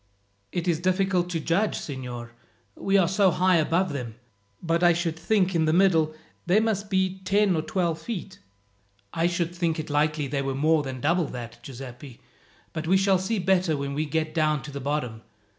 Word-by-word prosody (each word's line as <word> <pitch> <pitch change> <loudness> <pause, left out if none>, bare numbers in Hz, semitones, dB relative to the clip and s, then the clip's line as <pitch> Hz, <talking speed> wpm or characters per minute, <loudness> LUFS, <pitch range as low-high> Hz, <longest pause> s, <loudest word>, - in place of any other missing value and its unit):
"It 175 0 -3
is 165 -3 +2
difficult 185 0 +1
to 170 -2 -2
judge, 175 +7 +1
signor, 125 -4 -6 0.4
we 195 - +1
are 185 -3 +4
so 190 +1 +3
high 180 0 +3
above 165 +2 +1
them; 120 -5 -5 0.4
but 165 0 0
I 175 -1 +6
should 165 -1 -1
think 190 +2 +1
in 165 -2 +2
the 155 - +2
middle 165 -4 +3 0.3
they 185 +4 +5
must 210 -2 -1
be 190 -1 0
ten 195 0 +2
or 160 - +1
twelve 170 -1 -1
feet." 190 -1 -6 0.7
"I 165 +1 +2
should 175 -1 -1
think 170 -2 -1
it 155 -1 -5
likely 150 0 +1
they 140 0 -2
were 135 -1 -2
more 155 +3 +3
than 130 -3 -6
double 170 +4 +2
that, 120 -3 -8
Giuseppi; 130 -1 -10 0.5
but 160 0 -4
we 190 +3 +5
shall 195 -1 +3
see 215 +4 -1
better 180 -4 +2
when 140 0 -3
we 150 +2 -1
get 155 0 -1
down 155 -3 +1
to 145 - -8
the 140 0 -6
bottom. 130 -5 -2
165 Hz, 190 wpm, -26 LUFS, 145-185 Hz, 0.7 s, I